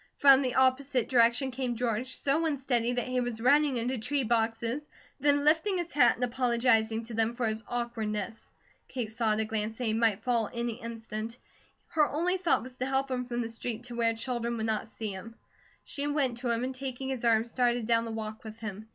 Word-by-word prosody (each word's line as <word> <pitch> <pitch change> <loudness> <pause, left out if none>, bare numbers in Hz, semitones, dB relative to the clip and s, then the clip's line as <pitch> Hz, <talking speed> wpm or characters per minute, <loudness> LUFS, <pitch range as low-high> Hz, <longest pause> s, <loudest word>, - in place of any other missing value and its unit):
From 275 -1 +7
the 255 -2 -1
opposite 260 -1 +2
direction 240 +2 +4
came 250 -1 -2
George, 245 +2 -1
so 285 +4 +1
unsteady 255 -5 0
that 245 -1 -1
he 255 0 -1
was 240 -2 -3
running 280 +2 +4
into 245 +2 -1
tree 275 +5 0
boxes, 230 +3 0 0.4
then 285 +1 +3
lifting 335 +6 +3
his 345 -1 -3
hat 250 -4 +5
and 250 - -4
apologizing 235 -2 +2
to 230 +1 -9
them 225 +1 +1
for 240 -1 -1
his 220 0 -1
awkwardness. 225 -3 -3 0.4
Kate 235 -4 -4
saw 220 -1 +1
at 215 - -1
a 220 - +1
glance 220 0 -3
that 250 - -4
he 220 -2 +1
might 225 -2 +1
fall 235 -4 +1
any 235 0 -3
instant. 225 0 -6 0.5
Her 305 -2 +3
only 350 +5 +1
thought 355 -9 +1
was 255 0 -10
to 255 - -2
help 270 0 0
him 250 -1 -1
from 240 -1 -2
the - - -3
street, 230 0 -5
to 245 -1 -7
where 230 -1 +2
children 235 0 -2
would 220 - -2
not 220 -1 -1
see 220 -1 -5
him. 210 +4 -9 0.5
She 285 0 -4
went 280 -5 0
to 245 -1 -2
him 235 +1 0
and 260 +1 -2
taking 265 0 -5
his 260 -3 -3
arm 225 -2 +4
started 240 0 0
down 230 0 +2
the - - -5
walk 220 +1 -5
with 220 0 -9
him. 220 -1 -7
240 Hz, 215 wpm, -29 LUFS, 225-260 Hz, 0.5 s, From